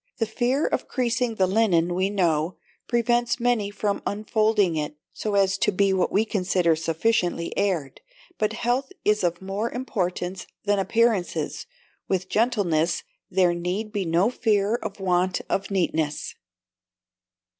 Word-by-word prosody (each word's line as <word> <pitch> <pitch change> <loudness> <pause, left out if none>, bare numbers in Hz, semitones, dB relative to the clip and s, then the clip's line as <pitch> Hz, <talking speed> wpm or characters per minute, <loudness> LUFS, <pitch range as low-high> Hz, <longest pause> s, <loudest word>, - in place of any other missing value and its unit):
The 225 - +1
fear 245 +6 0
of - - -1
creasing 245 -2 0
the 190 - +3
linen, 185 -4 +2
we 185 +2 +1
know, 170 -4 0 0.3
prevents 240 +1 +1
many 235 -4 +1
from 205 0 -2
unfolding 215 -3 +1
it, 150 -1 -3 0.2
so 210 -2 -2
as 195 0 +2
to - - +2
be 195 0 +2
what 185 - +1
we 215 +3 +2
consider 180 -5 +1
sufficiently 170 +2 0
aired: 180 -9 -1 0.4
but 215 0 +1
health 245 +4 -1
is 210 -1 +3
of 175 +1 -1
more 200 +4 -2
importance 185 -7 -3 0.2
than 205 -1 +2
appearances; 225 -2 0 0.4
with 185 -1 -1
gentleness 175 -8 +1 0.3
there 180 -2 +3
need 180 +5 -3
be 205 -2 -1
no 175 +6 +2
fear 210 -3 +1
of 210 -4 -4
want 185 -1 +1
of 195 - -1
neatness. 160 -6 -1
200 Hz, 140 wpm, -25 LUFS, 180-220 Hz, 0.4 s, the